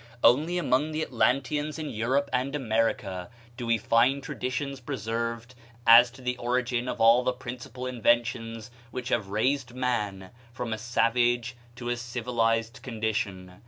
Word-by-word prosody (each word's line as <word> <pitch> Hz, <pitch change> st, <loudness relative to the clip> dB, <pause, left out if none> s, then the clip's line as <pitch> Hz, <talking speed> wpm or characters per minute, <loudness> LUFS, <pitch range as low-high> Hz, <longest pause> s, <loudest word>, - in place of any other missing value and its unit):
Only 155 Hz, +9 st, +4 dB
among 155 Hz, -2 st, +1 dB
the 155 Hz, +1 st, -1 dB
Atlanteans 140 Hz, +5 st, 0 dB
in 155 Hz, -2 st, -4 dB
Europe 130 Hz, +6 st, 0 dB
and 130 Hz, +3 st, 0 dB
America 110 Hz, -7 st, -1 dB, 0.3 s
do 120 Hz, -1 st, -5 dB
we 115 Hz, 0 st, +3 dB
find 120 Hz, +5 st, +2 dB
traditions 135 Hz, +2 st, -3 dB
preserved 115 Hz, -2 st, -4 dB, 0.3 s
as 120 Hz, +1 st, +9 dB
to 130 Hz, +2 st, -15 dB
the 125 Hz, 0 st, -1 dB
origin 125 Hz, 0 st, -1 dB
of -, -, -3 dB
all 115 Hz, +2 st, +6 dB
the 125 Hz, -, +2 dB
principal 125 Hz, 0 st, -7 dB
inventions 115 Hz, -2 st, 0 dB, 0.2 s
which 125 Hz, +1 st, -5 dB
have 100 Hz, -, 0 dB
raised 125 Hz, +5 st, 0 dB
man 105 Hz, -7 st, -2 dB, 0.2 s
from 120 Hz, -2 st, -4 dB
a 110 Hz, -, -4 dB
savage 120 Hz, +1 st, +1 dB, 0.2 s
to 120 Hz, 0 st, -5 dB
a 120 Hz, -, 0 dB
civilized 115 Hz, 0 st, -1 dB
condition. 105 Hz, -6 st, -3 dB
120 Hz, 145 wpm, -27 LUFS, 115-130 Hz, 0.3 s, as